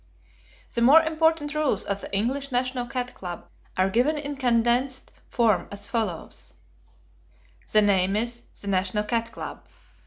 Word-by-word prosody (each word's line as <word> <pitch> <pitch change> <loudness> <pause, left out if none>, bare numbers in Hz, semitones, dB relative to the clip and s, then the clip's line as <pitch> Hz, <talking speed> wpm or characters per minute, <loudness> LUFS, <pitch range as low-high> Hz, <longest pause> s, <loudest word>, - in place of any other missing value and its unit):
The 235 - 0
more 290 +7 +8
important 320 -2 +1
rules 300 -9 +1
of 200 0 -3
the - - -8
English 265 +8 -1
National 250 0 -1
Cat 250 -1 -3
Club 175 - -7 0.3
are 185 +1 +3
given 250 +10 +2
in 290 0 -3
condensed 250 +1 +1 0.2
form 230 -5 +2
as 200 0 -5
follows: 225 0 -3 1.2
The 215 0 +5
name 195 -1 +3
is 235 +2 -1 0.2
"The 200 - -9
National 195 +2 +1
Cat 230 +1 -1
Club." - - -7
235 Hz, 145 wpm, -25 LUFS, 205-270 Hz, 1.2 s, more